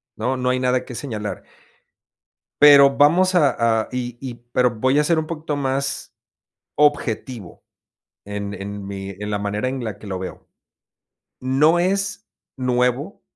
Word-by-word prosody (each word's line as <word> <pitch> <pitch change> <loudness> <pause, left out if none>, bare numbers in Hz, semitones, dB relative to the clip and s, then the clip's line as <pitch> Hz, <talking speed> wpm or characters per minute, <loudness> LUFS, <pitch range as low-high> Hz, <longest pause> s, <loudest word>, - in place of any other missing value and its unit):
¿no?, 125 +4 -1
no 125 0 0
hay 130 0 +1
nada 125 0 0
que 125 - -9
señalar. 110 -6 -5 1.2
Pero, 140 -2 +8
vamos 175 +7 +4
a 115 -9 +3
a - - -10
y 125 -1 -4
y 130 -3 -6 0.2
pero 125 0 +3
voy 130 +5 +1
a 150 - +3
ser 165 +1 +2
un 160 - -1
poquito 155 -2 -4
más 140 0 -2 0.6
objetivo, 130 - -1 0.6
en 100 0 -5
en 100 0 -7
mi 95 -1 -6
en 105 +2 -7
la 105 - -1
manera 105 +3 -2
en 130 -1 -4
la 110 -4 -5
que 105 - -11
lo 95 -2 -3
veo. 95 0 -8 0.9
No 145 +6 +3
es 195 +3 -1 0.3
nuevo 125 - -1
125 Hz, 155 wpm, -21 LUFS, 110-145 Hz, 1.2 s, Pero